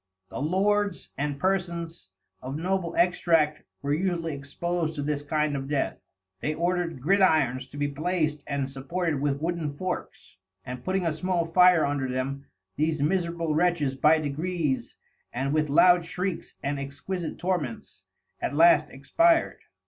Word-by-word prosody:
The -, -, -5 dB
Lords 200 Hz, +5 st, 0 dB
and 145 Hz, 0 st, -3 dB
Persons 170 Hz, -, -2 dB, 0.3 s
of 135 Hz, +3 st, -5 dB
Noble 180 Hz, +1 st, -1 dB
Extract 165 Hz, -4 st, +2 dB, 0.2 s
were 140 Hz, +1 st, 0 dB
usually 170 Hz, -2 st, -1 dB
expos'd 160 Hz, +3 st, -3 dB
to 145 Hz, -, -3 dB
this 145 Hz, 0 st, -1 dB
kind 150 Hz, 0 st, 0 dB
of 135 Hz, -1 st, -4 dB
Death; 145 Hz, -1 st, -2 dB, 0.4 s
they 155 Hz, +7 st, -2 dB
order'd 170 Hz, -5 st, -1 dB
Gridirons 155 Hz, -8 st, +3 dB
to 145 Hz, -, -11 dB
be 145 Hz, 0 st, 0 dB
placed 155 Hz, 0 st, -1 dB
and 140 Hz, -2 st, -1 dB
supported 145 Hz, +3 st, -2 dB
with 140 Hz, -1 st, 0 dB
wooden 165 Hz, -3 st, -1 dB
Forks, 185 Hz, +1 st, -5 dB, 0.3 s
and 125 Hz, 0 st, -7 dB
putting 185 Hz, -1 st, 0 dB
a 165 Hz, -, +1 dB
small 175 Hz, +1 st, 0 dB
Fire 180 Hz, 0 st, +5 dB
under 140 Hz, -2 st, -1 dB
them, 135 Hz, +2 st, -3 dB, 0.3 s
these 155 Hz, +1 st, +1 dB
miserable 170 Hz, 0 st, 0 dB
Wretches 160 Hz, -4 st, +2 dB
by 150 Hz, +4 st, +4 dB
degrees 155 Hz, -1 st, -2 dB, 0.4 s
and 135 Hz, +3 st, -2 dB
with 155 Hz, -1 st, +1 dB
loud 175 Hz, +4 st, +6 dB
Shreiks 180 Hz, +1 st, -4 dB
and 140 Hz, 0 st, -1 dB
exquisite 145 Hz, +6 st, -5 dB
Torments, 175 Hz, -10 st, -3 dB, 0.4 s
at -, -, -2 dB
last 155 Hz, -2 st, +6 dB
Expir'd. 335 Hz, -, +2 dB
155 Hz, 145 wpm, -27 LUFS, 140-175 Hz, 0.4 s, loud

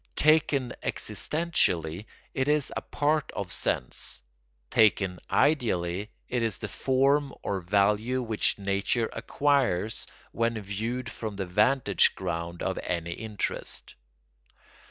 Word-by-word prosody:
Taken 150 Hz, -4 st, +3 dB
existentially 100 Hz, -, 0 dB, 0.3 s
it 130 Hz, +1 st, 0 dB
is 150 Hz, -2 st, +2 dB
a -, -, -2 dB
part 150 Hz, +1 st, 0 dB
of 95 Hz, -3 st, -3 dB
sense; -, -, 0 dB, 0.5 s
taken 100 Hz, -4 st, +3 dB
ideally 105 Hz, -, +1 dB, 0.2 s
it 125 Hz, -1 st, -1 dB
is 115 Hz, -3 st, 0 dB
the 105 Hz, -, -5 dB
form 135 Hz, +7 st, +1 dB
or 100 Hz, -, -1 dB
value 105 Hz, +7 st, +2 dB
which 110 Hz, -2 st, +1 dB
nature 100 Hz, +3 st, 0 dB
acquires 135 Hz, -8 st, 0 dB, 0.2 s
when 115 Hz, -1 st, 0 dB
viewed 110 Hz, +5 st, -3 dB
from 110 Hz, -3 st, -5 dB
the 95 Hz, -1 st, -3 dB
vantage 105 Hz, +3 st, +3 dB
ground 85 Hz, -1 st, -4 dB
of 95 Hz, -, -1 dB
any 85 Hz, -1 st, -3 dB
interest. 105 Hz, +1 st, -4 dB
110 Hz, 115 wpm, -28 LUFS, 95-130 Hz, 0.5 s, Taken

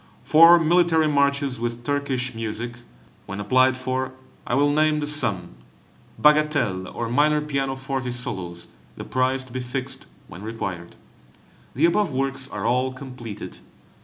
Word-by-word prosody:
Four 165 Hz, +2 st, +7 dB
military 165 Hz, -1 st, +3 dB
Marches 140 Hz, -2 st, +1 dB
with 120 Hz, 0 st, -4 dB
Turkish 135 Hz, -2 st, -1 dB
music; 115 Hz, +1 st, -5 dB, 0.5 s
when 100 Hz, -, -6 dB
applied 130 Hz, +5 st, +3 dB
for, 130 Hz, 0 st, -3 dB, 0.3 s
I 120 Hz, -, 0 dB
will 145 Hz, +1 st, +3 dB
name 155 Hz, +1 st, +2 dB
the 150 Hz, -, -2 dB
sum. 105 Hz, -, -1 dB, 0.7 s
Bagatelles, 145 Hz, -11 st, +2 dB
or 120 Hz, -, -2 dB
minor 150 Hz, +5 st, +3 dB
pianoforte 135 Hz, -3 st, -3 dB
solos, 90 Hz, -8 st, -5 dB, 0.3 s
the -, -, -6 dB
price 130 Hz, +1 st, 0 dB
to 130 Hz, -2 st, -15 dB
be 130 Hz, -, -3 dB
fixed 130 Hz, +2 st, -5 dB, 0.2 s
when 95 Hz, 0 st, -11 dB
required. 95 Hz, -6 st, -6 dB, 0.8 s
The 145 Hz, +6 st, +3 dB
above 170 Hz, +1 st, +2 dB
works 135 Hz, 0 st, -2 dB
are 105 Hz, 0 st, -5 dB
all 125 Hz, +2 st, +1 dB
completed. 125 Hz, -5 st, -9 dB
130 Hz, 135 wpm, -23 LUFS, 120-145 Hz, 0.8 s, Four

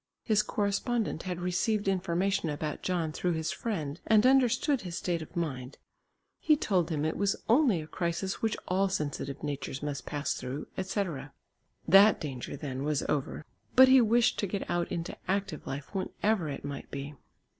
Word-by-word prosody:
His 215 Hz, -3 st, +3 dB
correspondent 210 Hz, -1 st, -1 dB
had 180 Hz, -1 st, -3 dB
received 180 Hz, +4 st, 0 dB
information 190 Hz, -1 st, 0 dB
about 150 Hz, 0 st, -3 dB
John 170 Hz, -4 st, -1 dB
through 175 Hz, +3 st, -1 dB
his 160 Hz, -1 st, -2 dB
friend 160 Hz, -9 st, -3 dB
and 220 Hz, 0 st, +5 dB
understood 265 Hz, +1 st, +3 dB
his 175 Hz, -2 st, -5 dB
state 170 Hz, -2 st, -1 dB
of 155 Hz, -, -10 dB
mind. 140 Hz, -6 st, -3 dB, 0.6 s
He 305 Hz, -, +4 dB
told 180 Hz, -, +1 dB
him 155 Hz, -2 st, -1 dB
it 160 Hz, -, -1 dB
was 200 Hz, -1 st, +1 dB
only 230 Hz, -, +4 dB
a -, -, -9 dB
crisis 170 Hz, +3 st, -3 dB
which 220 Hz, -1 st, 0 dB
all 190 Hz, +2 st, +2 dB
sensitive 145 Hz, -5 st, -3 dB
natures 140 Hz, -2 st, -4 dB
must 140 Hz, -4 st, -4 dB
pass 145 Hz, 0 st, -1 dB
through, 130 Hz, +4 st, -5 dB
etc. 180 Hz, -8 st, -3 dB, 0.5 s
That 195 Hz, +4 st, +7 dB
danger, 135 Hz, -5 st, -5 dB
then, 135 Hz, -3 st, -4 dB
was 150 Hz, -1 st, 0 dB
over. 145 Hz, +1 st, -2 dB, 0.3 s
But 260 Hz, 0 st, +9 dB
he 260 Hz, -1 st, +8 dB
wished 235 Hz, +2 st, +3 dB
to 200 Hz, -, 0 dB
get 195 Hz, +1 st, -3 dB
out 175 Hz, 0 st, -1 dB
into 170 Hz, -1 st, -3 dB
active 190 Hz, -5 st, -2 dB
life 140 Hz, +6 st, -6 dB
when 190 Hz, -2 st, -2 dB
ever 205 Hz, -7 st, +2 dB
it 140 Hz, 0 st, -6 dB
might 140 Hz, -1 st, -6 dB
be. 140 Hz, +1 st, -6 dB
175 Hz, 175 wpm, -30 LUFS, 150-205 Hz, 0.6 s, But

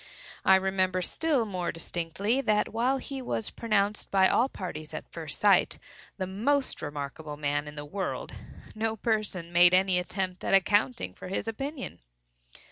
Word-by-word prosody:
I 190 Hz, -, +7 dB
remember 185 Hz, -1 st, +1 dB
still 295 Hz, -, +1 dB
more 180 Hz, -4 st, -2 dB
distinctly, 175 Hz, +9 st, -1 dB
that 215 Hz, -5 st, +2 dB
while 250 Hz, +4 st, +2 dB
he 270 Hz, 0 st, -6 dB
was 225 Hz, -3 st, -2 dB
pronounced 210 Hz, -2 st, 0 dB
by 190 Hz, -1 st, +5 dB
all 250 Hz, +7 st, +3 dB
parties 155 Hz, -, -6 dB
at -, -, -6 dB
first 160 Hz, -3 st, -5 dB
sight 200 Hz, -3 st, +4 dB, 0.4 s
"the 190 Hz, -, -2 dB
most 255 Hz, +9 st, 0 dB
remarkable 145 Hz, 0 st, -5 dB
man 145 Hz, 0 st, -1 dB
in 150 Hz, -, -8 dB
the 145 Hz, 0 st, -6 dB
world," 190 Hz, +5 st, -4 dB, 0.4 s
no 220 Hz, 0 st, -1 dB
person 205 Hz, -6 st, -2 dB
made 175 Hz, +1 st, +7 dB
any 185 Hz, -1 st, +3 dB
attempt 185 Hz, 0 st, -3 dB
at -, -, +3 dB
accounting 135 Hz, -, +2 dB
for -, -, -9 dB
his 195 Hz, +3 st, -3 dB
opinion. 265 Hz, -, -5 dB
190 Hz, 155 wpm, -28 LUFS, 170-220 Hz, 0.4 s, I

